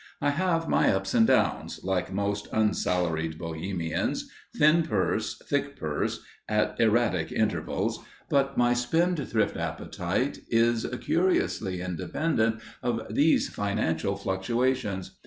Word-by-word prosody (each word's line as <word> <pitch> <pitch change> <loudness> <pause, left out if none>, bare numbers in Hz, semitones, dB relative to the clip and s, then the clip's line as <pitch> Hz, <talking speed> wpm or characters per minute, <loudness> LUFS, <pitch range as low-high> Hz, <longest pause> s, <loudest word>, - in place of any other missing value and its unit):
I 145 - +2
have 165 +1 0
my - - +3
ups 95 0 -1
and 115 - +5
downs, - - +1
like 95 -1 -1
most 100 +1 -2
unsalaried 90 -7 0
Bohemians, 85 0 -3 0.3
thin 155 +3 +5
purse, 160 - -1
thick - - -1
purse, - - -2 0.3
at 105 0 +1
erratic 115 +1 +2
intervals, - - -1 0.2
but 140 -1 +1
my 120 0 +4
spendthrift 130 - +1
appetite - - -2
is 115 0 +2
curiously 110 - +1
independent 110 - -1 0.2
of 115 -3 -2
these 150 +7 +3
financial 100 -2 -1
fluctuations. 100 0 -1
110 Hz, 110 wpm, -27 LUFS, 95-130 Hz, 0.3 s, and